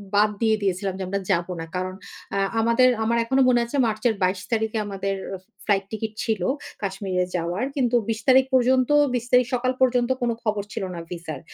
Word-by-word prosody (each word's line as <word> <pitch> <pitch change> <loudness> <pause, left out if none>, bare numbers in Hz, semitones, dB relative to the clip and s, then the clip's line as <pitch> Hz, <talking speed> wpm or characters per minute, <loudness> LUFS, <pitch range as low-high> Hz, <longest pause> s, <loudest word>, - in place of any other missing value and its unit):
বাদ 210 +1 +5
দিয়ে 220 -1 +4
দিয়েছিলাম 190 0 -1
যে, 190 - -4
আমরা 200 +1 -1
যাবো 175 0 0
না। 165 - -4
কারণ 185 +1 -2 0.4
অ্যা 195 - 0 0.2
আমাদের 235 +3 +4 0.2
আমার 235 +1 +1
এখনো 265 +3 +2
মনে 240 -1 +4
আছে 235 - -7
মার্চের 220 +1 0
২২ 185 +1 +1
তারিখে 220 0 0
আমাদের 195 -1 -3 0.5
ফ্লাইট 195 -2 +2
টিকেট 220 0 -4
ছিল 220 -5 -1 0.4
কাশ্মীরে 190 -2 -1
যাওয়ার। 175 +6 -1
কিন্তু 250 -3 +1
২০ 220 0 -1
তারিখ 260 0 +6
পর্যন্ত 255 0 +3 0.2
২০ 240 -1 -1
তারিখ 250 0 +5
সকাল 255 +1 +1
পর্যন্ত 245 -1 +3
কোন 240 - +1
খবর 210 -2 -1
ছিল - - -3
না 170 - -5
ভিসার। 165 -5 -6
215 Hz, 185 wpm, -24 LUFS, 190-240 Hz, 0.5 s, তারিখ